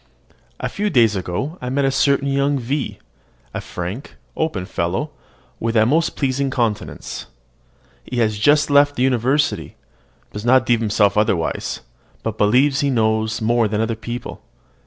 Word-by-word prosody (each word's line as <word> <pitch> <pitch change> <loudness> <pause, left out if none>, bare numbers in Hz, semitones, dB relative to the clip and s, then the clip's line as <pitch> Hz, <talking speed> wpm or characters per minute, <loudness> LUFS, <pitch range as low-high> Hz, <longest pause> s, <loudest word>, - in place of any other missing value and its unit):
A - - -2
few 210 +1 -2
days 115 - +4
ago 95 - -3
I 125 - -3
met 140 +2 +1
a 135 - +2
certain 140 +1 +2
young 140 +1 +1
V, 135 +3 -3 0.6
a - - -3
frank, 90 +10 -6 0.2
open 110 - -2
fellow, 95 - -2 0.5
with 115 +1 -2
a 110 - +5
most 160 +7 +1
pleasing 135 0 0
countenance. 115 -6 -3 0.8
He 125 - -6
has 110 -3 +1
just 145 +5 +3
left 145 0 +5
the 125 - 0
university, 130 +3 +1 0.6
does 105 - -6
not 130 +2 +4
deem 120 -2 +3
himself 105 -2 +2
overwise, 100 -6 0 0.4
but 110 -1 -4
believes 130 +7 +3
he 140 - +1
knows 110 -3 +1
more 115 0 +3
than 105 0 -2
other 115 0 0
people. 120 +2 -7
120 Hz, 155 wpm, -20 LUFS, 110-140 Hz, 0.8 s, a